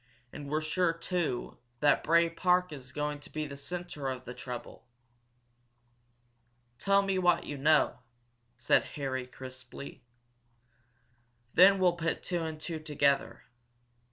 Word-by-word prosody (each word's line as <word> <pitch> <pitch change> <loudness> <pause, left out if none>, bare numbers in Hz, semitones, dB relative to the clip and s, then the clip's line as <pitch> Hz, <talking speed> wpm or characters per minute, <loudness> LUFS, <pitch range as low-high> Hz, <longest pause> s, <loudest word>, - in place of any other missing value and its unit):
And 145 -1 -7
we're 155 +2 0
sure, 165 +2 +1
too, 165 -6 -3 0.2
that 145 -1 +3
Bray 170 +1 +4
Park 180 +1 +1
is 130 -3 -10
going 150 0 -3
to 145 - -14
be 155 0 -3
the 140 -1 -7
centre 170 -1 -6
of 130 -1 -5
the 125 - -6
trouble." 125 0 -8 1.9
"Tell 200 0 +3
me 195 -1 0
what 175 -2 +3
you 145 - -5
know," 150 0 +3 0.6
said 120 - +3
Harry, 130 -3 -3
crisply. 130 +1 -10 1.5
"Then 195 +2 +7
we'll 185 -2 +4
put 165 0 -2
two 175 -2 -2
and 160 -1 -5
two 160 0 -5
together. 145 -3 0
155 Hz, 130 wpm, -30 LUFS, 140-175 Hz, 1.9 s, Then